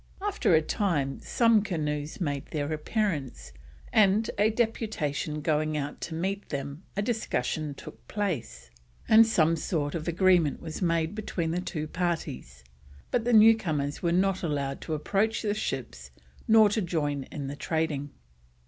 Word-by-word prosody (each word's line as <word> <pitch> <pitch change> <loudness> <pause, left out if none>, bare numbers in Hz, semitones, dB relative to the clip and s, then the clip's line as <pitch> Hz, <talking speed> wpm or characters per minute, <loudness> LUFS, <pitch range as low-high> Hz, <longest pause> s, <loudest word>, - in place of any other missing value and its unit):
After 395 - +2
a 160 - +4
time 155 -7 -1
some 230 -3 +3
canoes 150 -6 -3
made 145 -4 -2
their 150 -1 -2
appearance, 150 - -2 0.4
and 215 +1 +4
on 205 - +5
a - - +2
deputation 210 -10 -1
going 155 0 0
out 145 0 -4
to 165 - -4
meet 195 +4 -3
them 140 +2 -5 0.2
a 200 - +1
discussion 155 - -2
took - - -12
place, 115 - -3 0.4
and 220 +1 +7
some 165 -7 +3
sort 155 -3 -2
of 165 -1 -4
an 170 - -1
agreement 180 -5 +3
was 160 +2 -7
made 165 -1 +1
between 185 -6 -3
the 175 +2 -1
two 160 -4 -4
parties, 150 - -3 0.5
but 240 -2 0
the 245 - +2
newcomers 190 -11 +4
were 170 - +1
not 190 +2 +2
allowed 140 -4 -2
to 160 - -3
approach 210 +9 0
the 205 -1 +1
ships 125 - -4 0.4
nor 220 -1 +7
to 210 +2 0
join 145 -6 -1
in 140 - -6
the 140 +1 -5
trading. 150 -2 -2
160 Hz, 155 wpm, -28 LUFS, 145-205 Hz, 0.5 s, and